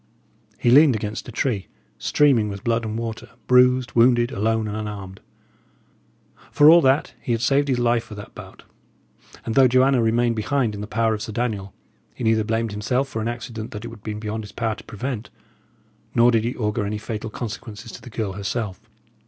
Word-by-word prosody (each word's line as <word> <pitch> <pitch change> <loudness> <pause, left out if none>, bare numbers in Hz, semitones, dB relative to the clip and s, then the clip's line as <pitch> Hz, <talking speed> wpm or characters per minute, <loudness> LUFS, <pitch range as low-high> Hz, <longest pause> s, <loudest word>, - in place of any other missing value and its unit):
He 120 - +2
leaned 140 -1 +7
against 105 +2 -4
a - - -7
tree, 110 -4 -1 0.3
streaming 130 -8 +3
with 100 -1 -7
blood 115 -1 0
and 110 0 -3
water, 115 -1 -5 0.2
bruised, 125 0 +4
wounded, 120 0 +4
alone, 110 +2 0
and 105 - -4
unarmed. 100 -3 -6 1.3
For 150 +2 +7
all 170 +1 +7
that, 135 +1 +2
he 120 - -1
had 115 - -1
saved 140 +4 +2
his 130 -3 +1
life 120 -1 +1
for 105 - -10
that 105 - -10
bout; - - -12 0.8
and 115 - -2
though 135 +1 +6
Joanna 130 +1 +3
remained 115 +1 +2
behind 120 0 0
in 100 - -6
the 105 - -5
power 110 0 +1
of 105 - -4
Sir 115 - -5
Daniel, 105 -5 -3 0.4
he - - -6
neither 110 -1 +3
blamed 115 0 -1
himself 125 +6 -1
for 110 - -4
an 110 - -2
accident 115 -1 -5
that 105 +2 -7
it - - -5
had 115 -2 -12
been 105 0 -5
beyond 110 +1 -4
his 105 - -10
power 115 -1 -2
to - - -12
prevent, 120 +1 -5 0.9
nor 120 +1 +5
did 115 -1 +1
he 120 - -2
augur 105 -1 -1
any 105 +1 -2
fatal 110 +1 -5
consequences 110 0 -7
to - - -10
the - - -11
girl 105 -4 -3
herself. 100 -1 -4
115 Hz, 200 wpm, -23 LUFS, 105-120 Hz, 1.3 s, leaned